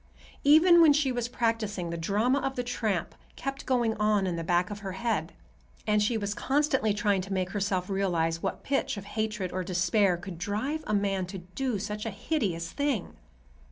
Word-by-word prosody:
Even 335 Hz, +4 st, +7 dB
when 310 Hz, -3 st, +7 dB
she 285 Hz, -2 st, +2 dB
was 245 Hz, -1 st, -2 dB
practicing, 225 Hz, -7 st, -1 dB
the -, -, -3 dB
drama 210 Hz, +11 st, +1 dB
of 270 Hz, 0 st, -2 dB
the 245 Hz, -, -1 dB
tramp 215 Hz, -8 st, -2 dB, 0.2 s
kept 275 Hz, +1 st, -5 dB
going 240 Hz, -4 st, +2 dB
on 210 Hz, -2 st, +2 dB
in 180 Hz, -2 st, -1 dB
the 165 Hz, -, -3 dB
back 175 Hz, +3 st, +1 dB
of 205 Hz, -, -5 dB
her 195 Hz, -2 st, -5 dB
head, 230 Hz, +4 st, -1 dB, 0.5 s
and 210 Hz, -1 st, +2 dB
she 225 Hz, +2 st, +1 dB
was 205 Hz, -1 st, -2 dB
constantly 265 Hz, -3 st, +1 dB
trying 205 Hz, -1 st, +1 dB
to 195 Hz, +2 st, -8 dB
make 185 Hz, -1 st, -1 dB
herself 195 Hz, -3 st, -1 dB
realize 170 Hz, -4 st, 0 dB
what -, -, -3 dB
pitch 275 Hz, -3 st, -1 dB
of 200 Hz, -, -7 dB
hatred 215 Hz, -3 st, -3 dB
or 185 Hz, 0 st, -2 dB
despair 180 Hz, +1 st, +2 dB
could 175 Hz, -1 st, -8 dB
drive 235 Hz, -, -2 dB
a -, -, -1 dB
man 195 Hz, -2 st, 0 dB
to 190 Hz, +1 st, -6 dB
do 205 Hz, +7 st, -3 dB
such 210 Hz, +2 st, -4 dB
a -, -, 0 dB
hideous 195 Hz, -, -2 dB
thing. 285 Hz, -9 st, -2 dB
205 Hz, 195 wpm, -28 LUFS, 185-245 Hz, 0.5 s, Even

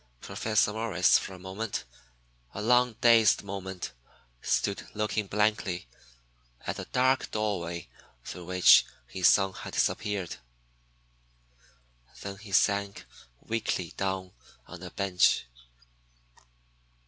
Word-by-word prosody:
Professor 110 Hz, -, 0 dB
Morris 105 Hz, -5 st, +3 dB
for 95 Hz, -, -7 dB
a -, -, -11 dB
moment, 95 Hz, +4 st, -4 dB, 0.7 s
a 100 Hz, -, -4 dB
long, 125 Hz, +1 st, +4 dB
dazed 115 Hz, -4 st, +5 dB
moment, 95 Hz, -2 st, -6 dB, 0.5 s
stood -, -, -1 dB
looking 105 Hz, -1 st, -1 dB
blankly 105 Hz, -, 0 dB, 0.8 s
at -, -, -3 dB
the -, -, -5 dB
dark 130 Hz, +1 st, +1 dB
doorway 90 Hz, -6 st, -3 dB, 0.4 s
through 90 Hz, -, -7 dB
which 90 Hz, +1 st, +7 dB, 0.2 s
his 90 Hz, +7 st, +2 dB
son 95 Hz, -1 st, +4 dB
had -, -, -8 dB
disappeared. 100 Hz, -5 st, -1 dB, 1.9 s
Then 100 Hz, 0 st, -6 dB
he 105 Hz, -1 st, -12 dB
sank 100 Hz, +1 st, +1 dB, 0.4 s
weakly 100 Hz, -6 st, -2 dB
down 95 Hz, -1 st, -2 dB, 0.4 s
on 90 Hz, -1 st, -10 dB
a 90 Hz, -, -7 dB
bench. 95 Hz, -10 st, +2 dB
100 Hz, 105 wpm, -28 LUFS, 95-110 Hz, 1.9 s, which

